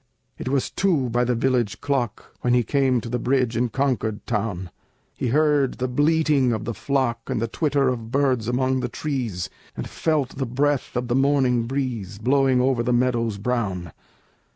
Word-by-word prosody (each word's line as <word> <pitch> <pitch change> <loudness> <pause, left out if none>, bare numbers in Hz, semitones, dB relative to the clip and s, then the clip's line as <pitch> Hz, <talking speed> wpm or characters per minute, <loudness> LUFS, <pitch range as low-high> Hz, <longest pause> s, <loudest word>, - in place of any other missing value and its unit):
It - - -6
was 135 -1 0
two 155 -11 +1
by 120 +1 +2
the 125 0 +1
village 120 -3 0
clock 130 -6 -2
When 125 0 +2
he 120 - +3
came 130 0 +2
to - - -7
the 125 +1 -2
bridge 125 -1 +1
in 120 +1 +1
Concord 115 -4 -1
town. 95 -4 -2 0.4
He - - -3
heard 145 0 +2
the 130 - -2
bleating 145 -1 +2
of 110 -1 -3
the 115 - -2
flock, 125 -3 -1
And - - 0
the 115 - -1
twitter 140 +2 +1
of 115 -3 -2
birds 130 -4 +1
among 130 +2 +1
the 125 -1 -2
trees, 120 - -3 0.3
And - - -4
felt 150 -6 -1
the 135 -2 -1
breath 140 +3 0
of 125 0 -1
the 120 - 0
morning 130 -3 +2
breeze 120 -7 -3
Blowing 130 +3 +3
over 130 -1 +2
the 125 +1 0
meadows 120 -3 +1
brown. 100 - -2
125 Hz, 180 wpm, -23 LUFS, 115-135 Hz, 0.4 s, he